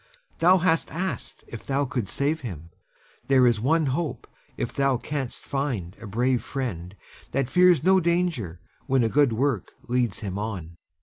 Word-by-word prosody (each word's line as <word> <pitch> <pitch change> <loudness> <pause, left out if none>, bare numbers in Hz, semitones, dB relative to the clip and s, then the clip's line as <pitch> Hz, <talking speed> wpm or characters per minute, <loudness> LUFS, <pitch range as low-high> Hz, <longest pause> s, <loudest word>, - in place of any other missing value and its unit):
Thou 180 +3 +6
hast 165 -2 +2
asked 185 +3 -4
if 115 - -8
thou 140 +1 0
couldst 120 -6 -3
save 150 +3 0
him. 85 - -7 0.6
There 130 -2 +5
is 120 -3 +3
one 160 +5 +3
hope, 145 +3 -2 0.3
if - - -3
thou 135 -2 +2
canst 135 0 -5
find 125 -11 -2
a 115 - -7
brave 125 +4 +1
friend 100 -9 -5 0.4
that 135 -2 0
fears 180 -3 +5
no 190 +2 +5
danger 170 - 0 0.3
when 135 -3 +3
a 115 - +2
good 145 0 +4
work 120 -2 -1
leads 120 -4 0
him 100 -2 -4
on. 90 -6 -5
130 Hz, 165 wpm, -25 LUFS, 110-150 Hz, 0.6 s, Thou